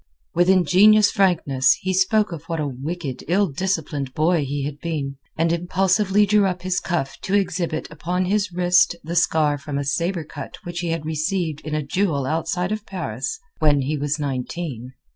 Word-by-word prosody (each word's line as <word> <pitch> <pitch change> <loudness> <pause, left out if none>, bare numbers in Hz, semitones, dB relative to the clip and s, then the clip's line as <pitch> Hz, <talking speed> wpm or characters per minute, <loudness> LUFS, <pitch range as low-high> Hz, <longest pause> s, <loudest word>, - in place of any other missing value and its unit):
With 175 +2 +3
ingenuous 190 +4 +5
frankness 165 - +3
he 185 0 -2
spoke 195 +3 +2
of 165 -2 -7
what 165 -1 -3
a 150 - 0
wicked, 140 +1 -5
ill 190 +5 +3
disciplined 145 -5 -2
boy 160 0 +2
he 140 0 -3
had 145 0 -5
been, 145 -5 -3 0.2
and 165 +1 +2
impulsively 190 +4 +2
drew 205 -1 +3
up 180 -1 -3
his 185 0 0
cuff 165 -6 -3
to 195 - -1
exhibit 180 -5 -1
upon 180 +4 -2
his 200 +1 0
wrist 175 0 +3
the 170 +2 -5
scar 155 -4 +2
from 140 0 -5
a 140 - -1
saber 170 +5 -1
cut 150 - -9
which 175 0 -5
he 175 - -3
had 165 -2 -2
received 160 0 -1
in 155 0 -4
a 155 - -1
duel 145 -2 0
outside 165 +5 -1
of 215 -1 -3
Paris 130 - -4 0.2
when 145 -3 +3
he 145 +4 -1
was 145 +1 -1
nineteen. 135 -2 -4
170 Hz, 180 wpm, -22 LUFS, 145-185 Hz, 0.2 s, ingenuous